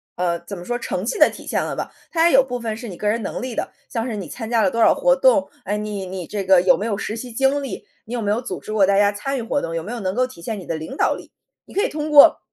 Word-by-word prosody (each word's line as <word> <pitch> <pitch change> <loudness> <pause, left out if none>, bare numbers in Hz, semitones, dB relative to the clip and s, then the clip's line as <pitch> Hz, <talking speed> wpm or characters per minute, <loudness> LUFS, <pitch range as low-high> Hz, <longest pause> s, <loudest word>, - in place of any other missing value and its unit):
呃， 170 -1 0
怎 180 +3 -8
么 175 - -8
说， 240 +6 -3
成 185 -5 -3
绩 240 - -2
的 - - +7
体 - - -11
现 - - 0
了 - - -3
吧， - - -4 0.2
它 335 0 +3
也 - - 0
有 270 - +8
部 250 -2 -4
分 225 -2 -4
是 235 0 -7
你 185 - -7
个 210 +3 -1
人 225 +2 0
能 195 - -4
力 255 -1 -4
的， - - -4 0.2
像 230 +1 -2
是 230 - -3
你 190 -6 -6
参 225 -2 -6
加 230 -2 +3
了 185 - +2
多 230 - -2
少 225 - +6
活 - - +4
动， - - +4 0.2
哎， 205 - -1
你 210 -2 -4
你 185 -1 -6
这 200 +2 -4
个 185 -2 +6
有 185 - +4
没 210 - -3
有 205 -3 -1
实 215 +2 -4
习 245 0 -7
经 270 +3 +2
历， 270 - -6 0.2
你 230 - -8
有 240 - -2
没 205 -1 0
有 225 - 0
组 - - -6
织 215 - -8
过 205 -3 +4
大 200 0 +3
家 205 0 +4
参 270 +7 -3
与 - - -2
活 255 +5 -1
动， 165 0 -4
有 165 - -2
没 210 - -7
有 240 - -4
能 190 -1 -2
够 255 +1 +2
体 255 -9 -12
现 215 +5 -4
你 185 - -8
的 165 - -3
领 160 +12 -7
导 - - +2
力， - - -12 0.3
你 - - -15
可 405 - +1
以 475 - +1
通 305 0 -4
过 290 -1 +8
220 Hz, 360 characters per minute, -21 LUFS, 195-255 Hz, 0.3 s, 有